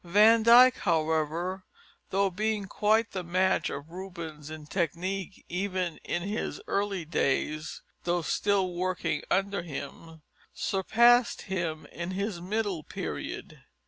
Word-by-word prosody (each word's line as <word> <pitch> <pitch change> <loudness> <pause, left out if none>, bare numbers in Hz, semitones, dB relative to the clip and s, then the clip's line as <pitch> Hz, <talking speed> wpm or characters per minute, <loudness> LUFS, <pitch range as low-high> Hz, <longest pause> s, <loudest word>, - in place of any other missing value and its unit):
Van 210 +6 +6
Dyck, 245 +3 +8
however, 165 +2 0 0.5
though 195 0 +2
being 210 +2 -1
quite 220 +4 +2
the 185 - -4
match 185 +2 +1
of 145 +3 -7
Rubens 170 -5 -7
in 155 -1 -8
technique, 185 +3 -3
even 185 -2 -2
in 175 - -2
his 205 +3 -3
early 200 -4 -1
days 155 0 -1 0.2
though 175 -1 0
still 195 0 +1
working 185 +1 -1
under 200 +1 +1
him 160 +1 -8 0.3
surpassed 235 +5 +3
him 170 -5 -3
in 170 +1 -5
his 195 -1 -3
middle 200 -2 -1
period. - - -6
185 Hz, 120 wpm, -29 LUFS, 165-200 Hz, 0.5 s, Dyck